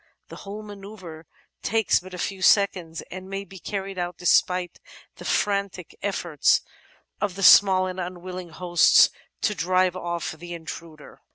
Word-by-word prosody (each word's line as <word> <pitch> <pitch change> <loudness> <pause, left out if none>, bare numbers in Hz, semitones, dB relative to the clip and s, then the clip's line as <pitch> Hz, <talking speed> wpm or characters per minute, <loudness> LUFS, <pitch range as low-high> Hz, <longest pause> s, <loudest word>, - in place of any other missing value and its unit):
The - - -10
whole 205 +2 -8
manoeuvre 195 -6 -10 0.3
takes 220 -1 +2
but 185 0 -10
a - - -7
few 190 +1 -4
seconds 185 -4 +2
and 185 +1 -8
may 195 0 -4
be 195 -1 -13
carried 195 0 -5
out 175 -1 -3
despite 180 0 +1 0.4
the - - -10
frantic 200 -4 -1
eflforts 175 -7 +1 0.6
of 205 -3 -1
the 195 - -4
small 190 0 +7
and 185 0 -5
unwilling 180 0 -6
hosts 175 +1 +4 0.3
to 210 - +1
drive 185 -1 +1
off 170 -2 -3
the 175 +2 -8
intruder. 160 -2 -10
185 Hz, 150 wpm, -24 LUFS, 175-195 Hz, 0.6 s, small